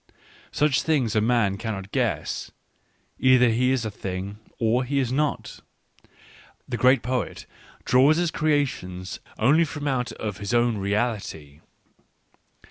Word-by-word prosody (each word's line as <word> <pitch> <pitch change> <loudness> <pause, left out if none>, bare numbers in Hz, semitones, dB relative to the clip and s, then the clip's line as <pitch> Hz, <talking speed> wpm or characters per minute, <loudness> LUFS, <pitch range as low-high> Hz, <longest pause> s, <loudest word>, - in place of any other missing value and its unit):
Such 150 -2 +2
things 130 -9 0
a 110 - +3
man 110 -4 +2
cannot 100 -4 -5
guess - - -2 0.4
— - - -42
he 130 0 +5
either 125 0 +5
is 125 +2 +1
the 110 - -3
thing, 100 +1 -6 0.2
or 115 +2 +1
he 140 +3 -2
is 130 -3 0
not. 150 +2 -2 1.1
The 125 - -3
great 125 +3 +4
poet 125 +1 -3 0.4
draws 135 +5 +5
his 175 -1 0
creations 130 -12 -1 0.2
only 150 +9 +4
from 145 -2 -4
out 130 -3 -1
of 105 -2 -5
his 100 +3 -2
own 120 -2 +2
reality. 100 -8 -2
120 Hz, 135 wpm, -24 LUFS, 105-135 Hz, 1.1 s, he